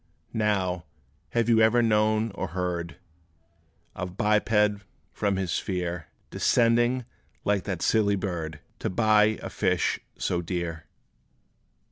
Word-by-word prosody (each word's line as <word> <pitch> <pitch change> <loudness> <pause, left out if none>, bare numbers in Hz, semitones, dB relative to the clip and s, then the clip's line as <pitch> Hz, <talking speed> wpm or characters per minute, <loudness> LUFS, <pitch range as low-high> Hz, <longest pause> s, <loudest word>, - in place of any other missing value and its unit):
Now, 95 -5 0 0.5
have 115 -1 +2
you 115 -1 +5
ever 115 +2 +5
known 110 0 +2
or 95 -1 -4
heard 85 -2 -2 1.0
Of 90 +1 -6
biped, 105 -1 +2 0.3
from 100 -2 0
his 95 -2 -2
sphere 90 -4 -2 0.2
Descending, 120 +1 +2 0.4
like 100 -2 +1
that 95 -4 -3
silly 105 -2 +3
bird, 85 -6 -4 0.2
To - - -2
buy 110 +1 +3
a - - -4
fish - - +1 0.2
so 85 - -1
dear? 85 -2 -4
100 Hz, 115 wpm, -27 LUFS, 90-110 Hz, 1.0 s, you